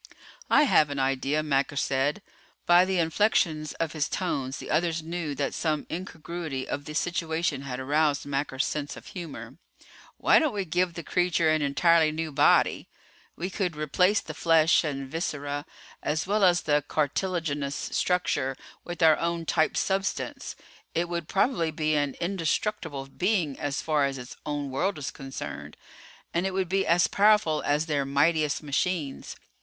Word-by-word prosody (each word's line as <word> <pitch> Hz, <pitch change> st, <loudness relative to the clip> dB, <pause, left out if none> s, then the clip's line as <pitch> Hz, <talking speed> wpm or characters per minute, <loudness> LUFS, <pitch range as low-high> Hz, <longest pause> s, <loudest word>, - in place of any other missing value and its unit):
"I 295 Hz, -, +6 dB
have 155 Hz, -, +4 dB
an 145 Hz, -, -4 dB
idea," 135 Hz, +3 st, 0 dB
Macker 140 Hz, -1 st, 0 dB
said. 140 Hz, +6 st, 0 dB, 0.4 s
By 175 Hz, +1 st, +6 dB
the 190 Hz, 0 st, 0 dB
inflections 165 Hz, -3 st, +1 dB
of 165 Hz, -2 st, -2 dB
his 155 Hz, -3 st, -1 dB
tones 135 Hz, -8 st, -2 dB
the -, -, -7 dB
others 165 Hz, 0 st, +1 dB
knew 165 Hz, -3 st, -4 dB
that 140 Hz, -1 st, -2 dB
some 155 Hz, -3 st, -1 dB
incongruity 165 Hz, -5 st, -5 dB
of 145 Hz, -, -4 dB
the 150 Hz, -, -7 dB
situation 165 Hz, -4 st, -1 dB
had 130 Hz, -2 st, -5 dB
aroused 145 Hz, +2 st, +1 dB
Macker's 140 Hz, 0 st, -1 dB
sense 145 Hz, -2 st, -4 dB
of -, -, -12 dB
humor. 140 Hz, -, -8 dB, 0.6 s
"Why -, -, +5 dB
don't 310 Hz, -8 st, 0 dB
we 200 Hz, -2 st, -1 dB
give 175 Hz, +1 st, 0 dB
the 170 Hz, -, -6 dB
creature 175 Hz, -2 st, +2 dB
an 155 Hz, 0 st, +2 dB
entirely 155 Hz, +3 st, +3 dB
new 160 Hz, 0 st, -3 dB
body? 145 Hz, +1 st, +3 dB, 0.5 s
We 185 Hz, +3 st, -4 dB
could 180 Hz, -4 st, -2 dB
replace 180 Hz, +7 st, +2 dB
the 155 Hz, -, -8 dB
flesh 165 Hz, +1 st, +4 dB
and 140 Hz, -3 st, -3 dB
viscera, 145 Hz, -1 st, -3 dB, 0.3 s
as 155 Hz, +1 st, -1 dB
well 205 Hz, +2 st, +1 dB
as 175 Hz, -2 st, +5 dB
the 145 Hz, -1 st, +1 dB
cartilaginous 150 Hz, -2 st, -1 dB
structure, 145 Hz, -7 st, -1 dB, 0.3 s
with 175 Hz, -1 st, -4 dB
our 160 Hz, -1 st, +6 dB
own 170 Hz, 0 st, -1 dB
type 160 Hz, 0 st, +1 dB
substance. 195 Hz, 0 st, -2 dB, 0.4 s
It 170 Hz, +1 st, 0 dB
would 170 Hz, -2 st, -3 dB
probably 195 Hz, -5 st, +1 dB
be 155 Hz, 0 st, -1 dB
an 145 Hz, -2 st, 0 dB
indestructible 170 Hz, -4 st, -2 dB
being 175 Hz, 0 st, -1 dB
as 145 Hz, 0 st, -2 dB
far 150 Hz, -3 st, +2 dB
as 135 Hz, -1 st, -2 dB
its 125 Hz, 0 st, -9 dB
own 145 Hz, -2 st, -3 dB
world 180 Hz, +8 st, 0 dB
is 135 Hz, -6 st, -4 dB
concerned. 135 Hz, -2 st, -7 dB, 0.6 s
And 175 Hz, +3 st, +1 dB
it 190 Hz, -, -4 dB
would 190 Hz, -2 st, -1 dB
be 195 Hz, +1 st, +1 dB
as 170 Hz, +2 st, +4 dB
powerful 205 Hz, -7 st, +3 dB
as 150 Hz, +2 st, +1 dB
their 145 Hz, -3 st, 0 dB
mightiest 150 Hz, +2 st, +1 dB
machines. 150 Hz, 0 st, -2 dB
155 Hz, 160 wpm, -27 LUFS, 145-175 Hz, 0.6 s, I